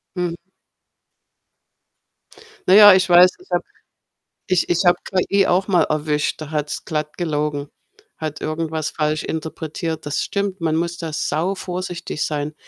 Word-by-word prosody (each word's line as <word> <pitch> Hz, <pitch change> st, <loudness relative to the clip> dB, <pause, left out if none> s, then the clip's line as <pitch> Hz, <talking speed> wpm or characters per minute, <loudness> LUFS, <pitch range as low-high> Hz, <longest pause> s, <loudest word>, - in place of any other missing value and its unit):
Mhm. 175 Hz, -1 st, -2 dB, 2.3 s
Na 185 Hz, -, +5 dB
ja, 205 Hz, -1 st, +10 dB
ich 185 Hz, 0 st, +2 dB
weiß, 175 Hz, +1 st, +8 dB
ich 365 Hz, -, -19 dB
habe -, -, +1 dB, 0.8 s
ich 185 Hz, -3 st, +1 dB
ich 175 Hz, +2 st, +1 dB
habe 175 Hz, 0 st, +5 dB
KI 195 Hz, +1 st, +1 dB
auch 185 Hz, +3 st, +2 dB
mal 180 Hz, -3 st, +3 dB
erwischt, 150 Hz, 0 st, -1 dB
da 155 Hz, 0 st, -7 dB
hat's 150 Hz, -1 st, -3 dB
glatt 150 Hz, -1 st, -3 dB
gelogen, 150 Hz, -4 st, -2 dB, 0.5 s
hat 155 Hz, -1 st, -5 dB
irgendwas 155 Hz, 0 st, -2 dB
falsch 155 Hz, 0 st, -1 dB
interpretiert. 160 Hz, 0 st, -5 dB
Das 145 Hz, 0 st, -2 dB
stimmt, 200 Hz, -2 st, -3 dB
man 160 Hz, -1 st, 0 dB
muss 170 Hz, +1 st, -1 dB
da 165 Hz, -2 st, -5 dB
sauvorsichtig 175 Hz, 0 st, -3 dB
sein 150 Hz, 0 st, -3 dB
165 Hz, 135 wpm, -21 LUFS, 155-180 Hz, 2.3 s, ja